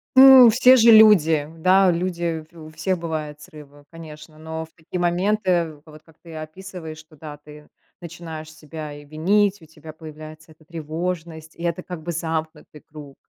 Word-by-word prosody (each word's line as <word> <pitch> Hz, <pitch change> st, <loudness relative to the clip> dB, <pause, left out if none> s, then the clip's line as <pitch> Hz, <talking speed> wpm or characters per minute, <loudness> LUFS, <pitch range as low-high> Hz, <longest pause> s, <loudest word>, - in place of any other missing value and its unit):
Ну 260 Hz, -2 st, +9 dB
все 255 Hz, +3 st, +5 dB
же 235 Hz, -2 st, +5 dB
люди. 170 Hz, -9 st, +5 dB
Да, 185 Hz, +3 st, +3 dB
люди, 170 Hz, -2 st, -3 dB
у 160 Hz, -2 st, -13 dB
в 155 Hz, -, -16 dB
всех 180 Hz, +4 st, -2 dB
бывают 155 Hz, -3 st, -6 dB
срывы, 145 Hz, -1 st, -16 dB
конечно, 155 Hz, -1 st, -13 dB
но 160 Hz, +1 st, -7 dB
в 160 Hz, -, -27 dB
такие 165 Hz, +2 st, -8 dB
моменты, 175 Hz, -3 st, -1 dB
вот 155 Hz, -1 st, -15 dB
как 160 Hz, -1 st, -23 dB
ты 165 Hz, -2 st, -13 dB
описываешь, 160 Hz, 0 st, -9 dB
что 155 Hz, 0 st, -17 dB
да, 150 Hz, 0 st, -11 dB
ты 150 Hz, 0 st, -16 dB, 0.3 s
начинаешь 165 Hz, -2 st, -9 dB
себя 155 Hz, -1 st, -10 dB
и 145 Hz, 0 st, -13 dB
винить, 195 Hz, +6 st, 0 dB
у -, -, -15 dB
тебя 155 Hz, 0 st, -14 dB
появляется 155 Hz, 0 st, -13 dB
эта 155 Hz, 0 st, -22 dB
тревожность, 165 Hz, 0 st, -6 dB
и 170 Hz, -, -11 dB
это, 170 Hz, +1 st, -3 dB
как 180 Hz, -3 st, -9 dB
бы, 170 Hz, -, -5 dB
замкнутый 160 Hz, -2 st, -6 dB
круг. 145 Hz, -2 st, -12 dB
160 Hz, 170 wpm, -21 LUFS, 155-175 Hz, 0.3 s, Ну